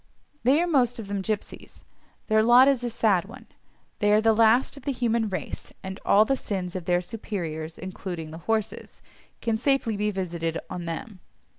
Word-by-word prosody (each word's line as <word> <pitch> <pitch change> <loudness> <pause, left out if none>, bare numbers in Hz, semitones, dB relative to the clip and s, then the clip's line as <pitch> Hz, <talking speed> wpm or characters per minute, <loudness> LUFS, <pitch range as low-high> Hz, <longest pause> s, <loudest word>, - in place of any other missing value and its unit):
They 265 +6 +4
are 345 - +2
most 255 -7 +2
of 220 -3 -7
them 200 -1 -2
gipsies. 210 +1 -5 0.4
Their 215 0 +3
lot 240 +4 +7
is 270 -3 +2
a 240 - -1
sad 210 -6 +2
one: 245 +6 -12 0.5
they 205 -1 +3
are 210 - +6
the 225 0 +4
last 230 +5 +4
of 280 - -11
the 280 - -2
human 235 -3 0
race, 190 - -6
and 190 0 -6
all 210 +2 +5
the 270 - +1
sins 185 -7 -4
of 180 -3 -4
their 175 0 +2
superiors 170 -6 -5
(including 180 -3 -6
the 160 - -8
horses) 220 -1 -2 0.4
can 225 -1 0
safely 270 -4 +1
be 210 +1 0
visited 170 -4 -3
on 180 -2 -5
them. 185 +5 -6
215 Hz, 185 wpm, -26 LUFS, 185-235 Hz, 0.5 s, lot